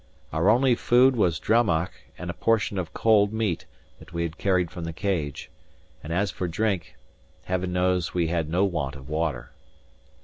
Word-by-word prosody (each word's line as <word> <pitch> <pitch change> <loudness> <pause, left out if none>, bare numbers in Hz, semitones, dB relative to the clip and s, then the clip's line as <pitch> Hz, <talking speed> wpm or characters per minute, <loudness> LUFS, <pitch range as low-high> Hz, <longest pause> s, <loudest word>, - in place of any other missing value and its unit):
Our 80 +5 +3
only 125 +3 +4
food 125 +2 +4
was 90 -9 +1
drammach 100 -7 +2 0.3
and 90 0 -4
a - - -9
portion 110 -2 +1
of 85 -3 -4
cold 105 -2 +3
meat 110 -6 -2 0.3
that - - -15
we 85 0 -1
had 85 +1 -5
carried 90 -3 +1
from 85 - -7
the 85 - -5
Cage; 80 -7 -3 0.5
and 75 - -6
as 100 +4 0
for 90 - -3
drink, 95 -1 -1 0.5
Heaven 95 0 -2
knows 90 -1 +1
we 85 -2 0
had 80 -2 -1
no 90 +4 +2
want 75 -7 -2
of 65 -2 -11
water. 75 -6 -2
90 Hz, 175 wpm, -25 LUFS, 80-105 Hz, 0.5 s, only